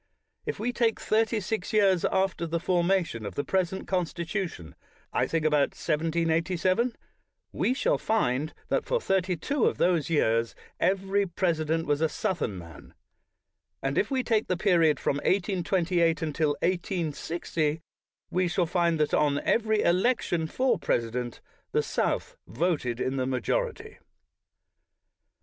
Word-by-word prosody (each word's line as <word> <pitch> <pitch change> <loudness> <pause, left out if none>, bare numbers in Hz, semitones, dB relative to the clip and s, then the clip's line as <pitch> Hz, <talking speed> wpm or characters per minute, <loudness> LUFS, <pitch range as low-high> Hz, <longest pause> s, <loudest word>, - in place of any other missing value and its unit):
If - - -2
we 240 +3 -1
take 230 -2 +1
thirty 220 +1 +1
six 210 -1 -3
years 195 -4 +4
after 190 -3 0
the 165 +1 -1
formation 175 - +1
of 100 - -6
the 145 - -1
present 190 0 -1
Constitution 175 - -3 0.2
— - - -34
I - - +1
think 165 -1 -1
about 150 -2 +2
1787 170 +7 0 0.3
— - - -54
we 255 - +2
shall - - +1
find 150 - 0 0.2
that - - +1
for - - 0
thirty 190 - 0
two 275 - 0
of - - -1
those 175 -4 +2
years 115 -7 +1 0.2
every 195 +2 +1
presi 170 -3 0
dent 165 +1 0
was 145 0 0
a 160 - +3
Southern 175 - -2
man; 85 -3 -12 0.9
and 135 +1 -1
if 205 - +1
we 260 -2 0
take 220 -3 +1
the 180 - 0
period 170 -5 +3
from 140 - 0
1828 175 -2 +1
until 155 0 0
1860, 170 -3 -1 0.5
we 185 0 +1
shall 175 +1 +1
find 170 -1 +1
that, 150 - +1
on 145 -1 +3
every 220 -2 +2
election 175 -3 +1
for 255 +10 +1
president, 120 +1 -2 0.3
the - - +2
South - - -1
voted 130 -4 -1
in 130 +1 -1
the 130 -1 0
majority. 440 - -2
170 Hz, 145 wpm, -27 LUFS, 155-195 Hz, 0.9 s, years